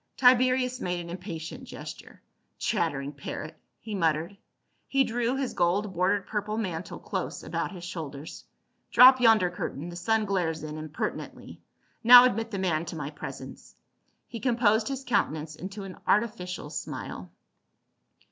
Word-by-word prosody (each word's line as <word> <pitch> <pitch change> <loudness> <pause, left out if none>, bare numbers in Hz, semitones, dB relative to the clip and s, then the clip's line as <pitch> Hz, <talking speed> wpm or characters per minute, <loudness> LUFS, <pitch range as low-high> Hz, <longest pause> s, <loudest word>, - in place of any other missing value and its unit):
Tiberius 255 0 +4
made 180 -1 -1
an 170 0 -7
impatient 170 -3 -7
gesture. - - -10 0.2
" - - -47
Chattering 145 -9 -1
parrot 145 +2 -7 0.2
!" - - -51
he 220 - -7
muttered. 165 0 0 0.5
He 275 0 +3
drew 240 +1 -1
his 270 -2 -2
gold 190 +3 +1
bordered 185 +2 +1
purple 210 0 -3
mantle 185 -6 -4
close - - -4
about - - -3
his 180 -3 -9
shoulders. 155 -4 -7 0.2
" - - -47
Drop 255 +1 +8
yonder 220 -6 +5
curtain; 170 -2 -5
the 170 - -8
sun 215 +5 +1
glares 170 -6 -1
in 155 0 -6
impertinently. 155 0 -6 0.4
Now 245 +2 +11
admit 225 -2 0
the 205 - -4
man 170 -4 0
to 165 - -6
my 150 -2 -5
presence." 150 - -9 0.5
He 230 - -7
composed 225 -3 +2
his 270 -1 -4
countenance 155 - -1
into 195 +4 -7
an 190 -1 -9
artificial 205 -5 0
smile. - - -6
190 Hz, 150 wpm, -28 LUFS, 165-230 Hz, 0.5 s, Now